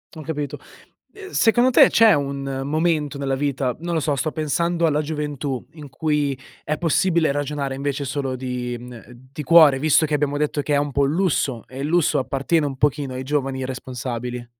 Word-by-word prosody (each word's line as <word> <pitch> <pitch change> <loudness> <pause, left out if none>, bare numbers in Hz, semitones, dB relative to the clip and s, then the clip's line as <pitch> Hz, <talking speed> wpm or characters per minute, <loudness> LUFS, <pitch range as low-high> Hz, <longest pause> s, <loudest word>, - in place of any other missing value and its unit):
Ho 160 - -8
capito. 150 -3 -4 0.6
Ehm, 395 -2 -10
secondo 240 - +3
te, 255 - +6
c'è 225 -2 +6
un 140 -2 -2
momento 155 -1 0
nella 135 -1 -1
vita, 135 -2 -1
non 170 +1 -4
lo 160 - 0
so, 145 -1 0
sto 155 +3 -2
pensando 170 +3 0
alla 150 -1 +2
gioventù, 145 -4 -4
in 150 -3 -11
cui 145 -1 -1 0.3
è 150 - -1
possibile 170 -1 +2
ragionare 145 -1 -3
invece 140 +1 -3
solo 135 -1 -3
di 125 -1 -4
mhmm, 120 -1 -11 0.3
di 150 +2 -6
cuore 155 -3 +6
visto 155 +2 +3
che 155 - -4
abbiamo 145 -1 0
detto 150 0 -1
che 145 - -2
è - - +4
un 145 0 -1
po' 140 - 0
un 140 +1 +2
lusso 150 - 0
e 130 - -10
il 140 - -2
lusso 170 -1 +2
appartiene 140 +4 0
un 140 -2 -3
pochino 145 -1 0
ai 130 +1 -5
giovani 135 -1 -2
irresponsabili? 125 -1 -5
145 Hz, 195 wpm, -22 LUFS, 135-155 Hz, 0.6 s, te